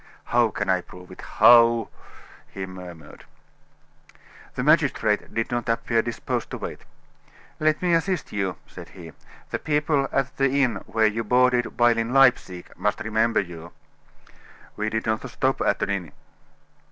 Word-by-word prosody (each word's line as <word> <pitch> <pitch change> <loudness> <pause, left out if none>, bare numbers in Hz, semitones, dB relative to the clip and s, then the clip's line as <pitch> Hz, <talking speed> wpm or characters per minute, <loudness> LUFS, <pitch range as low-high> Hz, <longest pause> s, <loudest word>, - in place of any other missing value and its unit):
"How 120 -1 +2
can - - -4
I 95 -1 +2
prove 90 0 -14
it - - -11
how?" 115 -1 +5 0.6
he 95 -1 -6
murmured. 90 -4 -11 1.3
The - - -2
magistrate - - +2
did 115 +1 -3
not 120 0 -2
appear 115 0 +1
disposed 115 0 -4
to - - -6
wait. - - -7 0.8
"Let 155 +2 +1
me 175 -1 +2
assist 170 +1 -1
you," 95 -3 -2
said - - -12
he. 85 -3 -10 0.4
"The - - -2
people 150 -2 0
at 135 0 -1
the 135 -1 +2
inn 120 -6 0
where 110 -1 +1
you 110 +2 0
boarded 125 +2 +2
while 120 -1 +4
in 115 +2 -2
Leipsic 125 -9 +2
must 105 - -1
remember 110 +1 +1
you." 85 -2 -10 1.0
"We 105 0 -2
did 110 0 -3
not 110 +4 -2
stop 130 +2 -1
at - - +1
an 100 - -1
inn." 90 -6 -4
115 Hz, 155 wpm, -24 LUFS, 95-125 Hz, 1.3 s, how